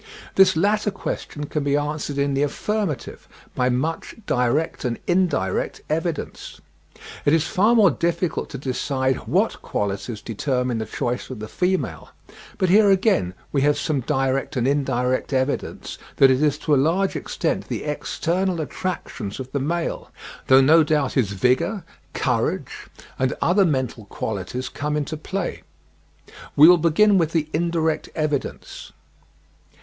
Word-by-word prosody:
This 190 -2 +5
latter 210 +4 +2
question 175 -6 -5
can 150 0 -2
be 140 0 +2
answered 145 -1 -3
in 140 0 +1
the 135 - 0
affirmative 160 - -2 0.3
by 125 0 +1
much 155 +7 -2
direct 125 +5 0
and 120 -3 -1
indirect 180 0 0
evidence. 165 0 -3 0.6
It 145 - +3
is 160 0 +3
far 210 +7 +3
more 205 -6 +6
difficult 170 +3 -1
to 140 - -6
decide 130 0 -1
what - - +1
qualities 100 +2 -3
determine 125 +1 -1
the 110 - -4
choice 120 +2 -3
of 130 - -6
the 110 +1 -6
females; 185 +9 -2 0.5
but 185 -3 +1
here 205 +2 +6
again 190 - +2 0.2
we 140 - +1
have 145 +1 +3
some 150 -3 -1
direct 135 0 -1
and 125 -1 +1
indirect 130 -2 0
evidence 130 +1 -2 0.2
that 135 -1 +6
it 130 +2 +2
is 150 -2 +2
to 150 - 0
a - - +5
large 180 +6 +1
extent - - -2
the - - -4
external 180 +1 -1
attractions 150 - -4
of 130 0 -7
the 140 - -1
male; 165 +5 -2 0.4
though 130 0 +7
no 160 +5 +6
doubt 150 -3 0
his 110 -8 +1
vigour, 125 - +1 0.3
courage, - - -1 0.3
and 130 -2 +1
other 190 +3 +3
mental 130 - -1
qualities 110 +5 -4
come 150 +1 -3
into 150 +1 -3
play. 185 +4 -4 0.9
We 150 +3 +9
will 175 0 +7
begin 190 +5 +4
with 165 -1 0
the 155 -2 0
indirect 160 -1 0
evidence. 150 -3 -3
150 Hz, 145 wpm, -23 LUFS, 130-170 Hz, 0.9 s, We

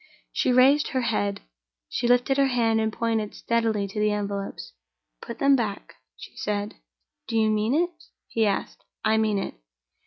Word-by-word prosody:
She - - +1
raised 265 +4 +5
her 260 - -1
head; 100 - -1 0.5
she 240 - -1
lifted 245 +2 +3
her 275 -1 +4
hand 230 -3 +2
and 220 0 0
pointed 225 -2 -1
steadily 225 -3 0
to 195 +2 -5
the 210 0 +3
envelopes. 200 - -4 0.5
"Put 235 - -7
them 275 0 +4
back," 215 -6 -3 0.2
she - - -12
said. 205 +1 -2 0.5
"Do 230 - -1
you 220 -1 +3
mean 215 +4 +1
it?" 345 +3 +2 0.4
he 225 -2 +1
asked. 200 - -3 0.2
"I 220 0 +3
mean 215 -2 +1
it." 195 - -3
220 Hz, 165 wpm, -25 LUFS, 210-245 Hz, 0.5 s, raised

